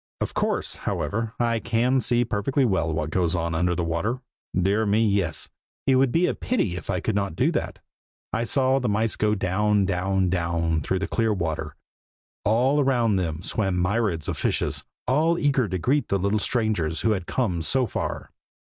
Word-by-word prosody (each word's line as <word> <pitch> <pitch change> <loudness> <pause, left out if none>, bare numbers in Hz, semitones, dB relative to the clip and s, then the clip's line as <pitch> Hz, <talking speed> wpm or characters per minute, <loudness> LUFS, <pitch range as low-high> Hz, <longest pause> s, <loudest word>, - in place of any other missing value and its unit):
Of - - -3
course, - - -1
however, 115 +2 -2
I 115 -1 +1
can 120 +3 +1
see 120 0 +2
perfectly 120 +5 0
well 95 -7 +1
what 75 0 -2
goes 85 0 +1
on 85 -1 -1
under 90 +2 +1
the 85 - -1
water. 85 +10 -1 0.4
Dear 100 +4 +2
me, 110 +2 +3
yes! 100 -6 0 0.4
it 135 - +4
would 130 -1 +3
be 170 +5 +3
a - - +1
pity 120 - -1
if 85 - -8
I 90 -2 0
could 110 - -1
not 100 -4 -1
do - - +2
that. - - -3 0.6
I 115 - 0
saw 130 +1 +2
the 125 - -1
mice 110 +2 +1
go 105 0 +1
down, 100 +1 +1
down, 95 -1 0
down, 85 -2 0
through 95 - -1
the 95 - -2
clear 115 -1 +1
water. 80 -4 -3 0.7
All 125 +8 +3
around 120 -7 +2
them 85 -2 -2
swam 95 -3 0
myriads 90 -4 0
of - - -3
fishes, - - 0 0.2
all 160 +6 +3
eager 140 -6 +2
to 95 - -1
greet 135 - +1
the 100 - +1
little 100 +3 +1
strangers 100 -9 0
who 110 - +2
had 95 -4 -2
come 95 -10 -1
so 130 +10 +2
far. - - -4
100 Hz, 190 wpm, -25 LUFS, 90-120 Hz, 0.7 s, it